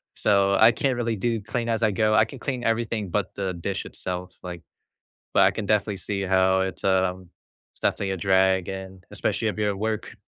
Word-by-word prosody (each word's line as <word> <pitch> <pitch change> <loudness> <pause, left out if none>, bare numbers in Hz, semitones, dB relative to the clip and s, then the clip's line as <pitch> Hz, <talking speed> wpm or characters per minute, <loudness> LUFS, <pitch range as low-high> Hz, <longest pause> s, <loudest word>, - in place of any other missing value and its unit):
so, 100 -1 +3
I 115 +1 +8
can't 130 +2 0
really 115 -2 -1
do 115 +2 -1
clean 115 +3 -3
as 115 0 0
I 110 - +4
go. 110 +2 +2
I - - +5
can 135 - -11
clean 125 -1 -3
everything 115 -3 -1
but 100 +3 -2
the 95 -2 -2
dish 95 +3 -4
itself, 90 0 -5
like, 90 -2 -7 0.7
but - - +6
I - - +5
can 110 - -4
definitely 105 -1 +1
see 100 0 -3
how 95 0 +3
it's, 95 - -5
um, 95 -1 +1 0.5
it's - - -21
definitely 95 -1 0
a - - -2
drag 95 0 +3
and 95 -1 -7
especially 110 - -1
if 105 - -4
you're 105 -1 +1
at 100 - -4
work. 110 0 -3
100 Hz, 210 wpm, -25 LUFS, 95-110 Hz, 0.7 s, I